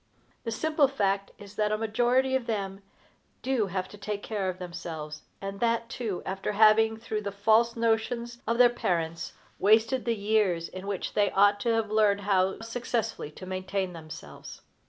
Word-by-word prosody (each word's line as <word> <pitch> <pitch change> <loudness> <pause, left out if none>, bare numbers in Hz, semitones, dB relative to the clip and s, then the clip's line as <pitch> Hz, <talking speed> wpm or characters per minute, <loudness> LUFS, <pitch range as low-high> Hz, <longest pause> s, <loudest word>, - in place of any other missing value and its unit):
The 230 - -2
simple 305 +4 +2
fact 200 -7 0
is 205 0 -12
that 210 0 +1
a 215 - +1
majority 245 +4 +2
of 260 -3 -1
them 195 -3 -3 0.6
do 255 -6 +1
have 185 0 -3
to 205 - -12
take 210 0 -4
care 200 -4 -2
of 185 - -4
themselves, 165 -4 -6 0.2
and 195 0 -6
that, 230 -1 +1
too, 220 -8 -4
after 195 +2 -3
having, 220 +1 +5
through 220 -1 -3
the 200 -1 -4
false 220 +4 +3
notions 235 +1 -1
of 230 - +1
their 245 0 +8
parents, 170 -7 -2 0.3
wasted 225 +5 +3
the 235 -1 +1
years 200 -5 +1
in 185 +1 -8
which 200 -2 -3
they 205 -1 +3
ought 205 +1 +4
to 230 +2 +1
have 220 -2 -1
learned 210 -2 +3
how 190 0 +1
successfully 230 -6 -3
to 170 +5 -11
maintain 185 0 -3
themselves. 155 - -10
210 Hz, 175 wpm, -28 LUFS, 190-230 Hz, 0.6 s, their